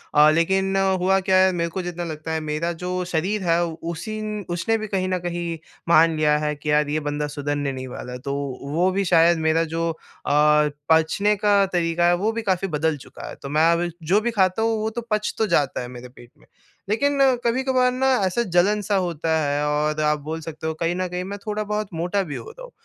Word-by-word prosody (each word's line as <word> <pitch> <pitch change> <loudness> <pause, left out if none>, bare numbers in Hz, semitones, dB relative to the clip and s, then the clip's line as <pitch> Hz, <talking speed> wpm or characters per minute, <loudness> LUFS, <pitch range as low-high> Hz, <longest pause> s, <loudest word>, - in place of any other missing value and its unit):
अ, 150 +1 +7
लेकिन 190 +4 +1
हुआ 190 0 +2
क्या 190 0 +2
है, 190 0 +5
मेरे 170 -2 -1
को 185 +3 -4
जितना 175 -1 -5
लगता 160 -1 -5
है, 160 - 0
मेरा 155 +2 -2
जो 180 0 -2 0.2
शरीर 190 +6 0
है, 170 0 +2
उसी 170 +6 -5
न 210 -1 -4
उसने 200 +6 0
भी 215 0 -5
कहीं 190 -2 -1
न 185 - 0
कहीं 170 -1 -3 0.3
मान 165 0 +5
लिया 150 -1 +3
है 150 0 -1
कि, 150 +1 -6
यार, 150 0 +2
ये 155 +1 0
बंदा 150 0 -2
सुधरने 145 -1 -2
नहीं 130 -1 -6
वाला 125 0 -7
है। 125 - -6
तो 140 +2 -4 0.3
वो 160 +6 +1
भी 195 +1 0
शायद 170 -1 +4
मेरा 160 +1 +3
जो 165 0 0 0.4
अ, - - -1 0.6
पचने 160 +6 +3
का 205 -1 +3
तरीका 170 -1 +1
है, 175 - +4
वो 205 +5 0
भी 230 0 -3
काफ़ी 190 -2 0
बदल 155 -2 0
चुका 130 - -11
है। - - -8
तो 140 - -6
मैं 155 +3 +4
अब 170 +1 0 0.2
जो 205 - +6
भी 240 +2 -1
खाता 190 -1 +1
हूँ, 225 0 +2
वो 220 - -1
तो 230 +2 -5
पच 215 0 0
तो 220 - +1
जाता 145 -9 +1
है 125 - -6
मेरे 125 0 -10
पेट 120 -1 -16
में। - - -23 0.4
लेकिन 280 +7 +1 0.2
कभी-कभार 255 +1 +2
ना, 260 +1 0 0.2
ऐसा 190 +5 0
जलन-सा 200 +2 +1
होता 165 -4 0
है 145 -1 0
और 150 +1 0
आप 150 0 +2
बोल 155 +3 -5
सकते 160 0 -6
हो, 160 - -1
कहीं 165 +2 -1
न 185 0 -1
कहीं 180 0 -4
मैं 200 +2 -6
थोड़ा-बहुत 210 0 -2
मोटा 175 +5 -1
भी 145 - -4
हो - - -7
रहा - - -12
हूँ - - -11
175 Hz, 230 wpm, -23 LUFS, 155-200 Hz, 0.6 s, अ